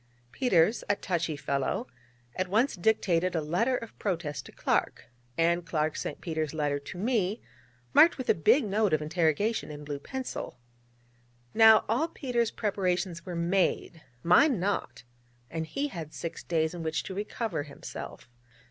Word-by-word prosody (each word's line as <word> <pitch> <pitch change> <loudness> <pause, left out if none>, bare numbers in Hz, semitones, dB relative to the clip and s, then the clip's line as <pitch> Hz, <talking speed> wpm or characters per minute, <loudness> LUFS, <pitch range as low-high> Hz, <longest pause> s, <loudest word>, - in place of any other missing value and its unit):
Peters, 200 - +2
a 205 - +4
touchy 170 -6 -2
fellow, 140 -1 -1 0.5
at 185 - -1
once 225 +9 +2
dictated 180 -3 +1
a - - +2
letter 180 +12 +1
of 230 - -9
protest 170 -7 -3
to - - -12
Clark; - - -1 0.3
and 170 +1 +2
Clark 155 -2 -1
sent 145 - -5
Peters' 155 -2 -3
letter 145 -2 0
to 140 +6 -9
me, 215 0 0 0.5
marked 335 +2 +7
with 260 - -5
a - - +5
big 225 - +3
note 205 -2 +1
of 155 - +2
interrogation 170 +8 0
in 150 -1 -8
blue 145 -1 -5
pencil. 260 - -6 1.0
Now, 220 -1 +7
all 245 +9 +1
Peters' 245 -8 -1
preparations 185 -4 -2
were 180 - -4
made, 170 -1 0 0.2
mine 225 - +5
not; 195 -7 -2 0.5
and 160 -1 -3
he 280 - -2
had 160 - -7
six 165 -1 -5
days 160 -1 0
in 175 - -6
which 160 -1 -2
to 190 - -6
recover 205 -3 -3
himself. 145 -3 -9
180 Hz, 155 wpm, -29 LUFS, 160-220 Hz, 1.0 s, marked